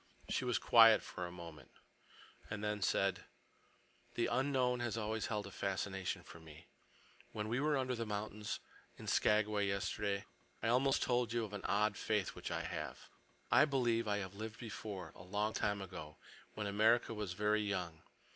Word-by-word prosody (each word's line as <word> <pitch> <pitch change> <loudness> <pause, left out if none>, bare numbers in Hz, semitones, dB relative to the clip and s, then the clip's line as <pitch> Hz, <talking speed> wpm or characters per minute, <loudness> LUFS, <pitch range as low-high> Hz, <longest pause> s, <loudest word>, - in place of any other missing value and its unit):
She 130 - 0
was 120 -4 +2
quiet 115 -2 +7
for 90 -1 -5
a - - -9
moment, 85 -3 -10 0.8
and 105 0 -4
then 105 -1 -1
said: 95 -1 +1 0.9
"The 120 - +2
unknown 130 -1 +1
has 120 -2 -2
always 110 0 -1
held 105 -2 -2
a 100 - -8
fascination 95 -1 -2
for 85 +1 -12
me. 80 -1 -13 0.7
When 105 0 -3
we 115 +4 0
were 150 0 +2
under 130 -1 0
the 115 -1 -2
mountains 105 0 -3 0.4
in - - -9
Skagway 105 -1 +3
yesterday, 100 0 -1 0.4
I 115 - +2
almost 130 +3 +3
told 120 -2 +1
you 120 -1 +1
of 105 - -10
an 100 - -4
odd 105 +1 +2
faith 105 -3 0
which - - -6
I - - -2
have. - - -5 0.4
I - - +7
believe 120 -5 +1
I 105 -1 +1
have 95 -1 -4
lived 110 +1 -6
before, 100 -6 -6
a - - -13
long 105 +4 -1
time 100 -1 0
ago, 75 -5 -8 0.4
when 105 - -3
America 110 +4 +3
was 105 -4 -3
very 105 +2 +2
young. 90 -6 -2
105 Hz, 175 wpm, -37 LUFS, 100-115 Hz, 0.9 s, quiet